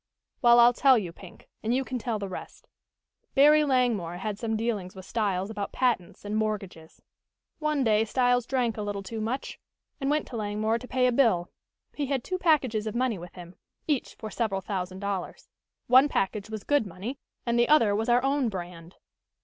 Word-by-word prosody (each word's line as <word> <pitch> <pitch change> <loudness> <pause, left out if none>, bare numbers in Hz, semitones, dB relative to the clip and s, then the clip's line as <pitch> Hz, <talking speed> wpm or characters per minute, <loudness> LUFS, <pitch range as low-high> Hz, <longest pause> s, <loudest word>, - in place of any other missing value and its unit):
"Well, 240 -1 +7
I'll 240 +1 +7
tell 265 +1 +5
you, 185 -6 -3
Pink, 185 0 -14
and 230 +3 0
you 265 - +1
can 255 -1 -4
tell 230 -1 -2
the 200 -1 -4
rest. 185 - -9 0.7
Barry 300 +2 +6
Langmore 240 - +1
had 205 +2 -4
some 225 -2 -1
dealings 215 -5 -3
with 190 -1 -10
Styles 200 -3 -1
about 205 -2 -4
patents 240 -8 -1
and 205 +1 -3
mortgages. 200 -7 -4 0.6
One 305 -3 0
day 220 -2 +3
Styles 245 +1 +1
drank 245 -4 0
a - - -3
little 205 -1 -4
too 220 +3 -5
much, 235 +5 -4 0.4
and 270 -1 -1
went 300 +1 +1
to 245 - -7
Langmore 215 +2 -1
to 250 - -10
pay 255 0 +1
a 250 - +4
bill. 225 -9 +2 0.4
He 290 -2 -3
had 265 -3 -1
two 370 0 -3
packages 260 -11 +2
of 215 - -4
money 240 -5 0
with 175 0 -10
him, 175 -1 -10 0.3
each 290 -5 -1
for 215 -1 -8
several 205 -4 -1
thousand 185 -1 -4
dollars. 200 -2 -4 0.4
One 260 +4 +6
package 205 -1 -1
was 220 -2 -6
good 290 -7 +1
money 200 +10 -6 0.3
and 235 0 +1
the 240 - +3
other 230 -10 +5
was 225 +3 -1
our 245 +1 +4
own 275 -2 +1
brand. 175 -3 -8
225 Hz, 195 wpm, -27 LUFS, 200-255 Hz, 0.7 s, Well